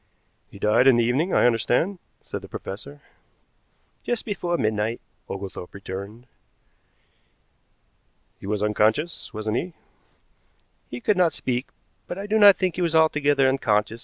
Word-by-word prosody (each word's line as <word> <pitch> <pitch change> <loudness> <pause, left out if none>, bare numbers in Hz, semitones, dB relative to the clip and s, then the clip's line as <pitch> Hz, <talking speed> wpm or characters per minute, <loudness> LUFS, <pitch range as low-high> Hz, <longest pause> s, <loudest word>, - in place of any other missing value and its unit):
"He - - -13
died 105 +6 +3
in 130 -3 +6
the 120 - +3
evening, 135 +10 +1
I - - +4
understand," 125 - +1 0.2
said - - -6
the - - -11
professor. 140 +9 -8 1.0
"Just 240 -2 -2
before 175 -5 -2
midnight," 110 0 -1 0.3
Oglethorpe 95 -2 -7
returned. 100 +4 -8 2.1
"He - - -9
was 105 0 -1
unconscious, 110 +10 0
wasn't 110 +1 -2
he?" 175 +4 -4 1.2
"He 120 - -7
could 210 - +1
not 175 -4 +3
speak, 125 -1 -2 0.4
but 175 - -5
I 200 - -5
do 215 +1 +1
not 205 -2 +9
think 185 -3 -1
he - - -1
was 165 -2 0
altogether 145 -3 +3
unconscious. 110 -4 0
125 Hz, 140 wpm, -24 LUFS, 105-170 Hz, 2.1 s, not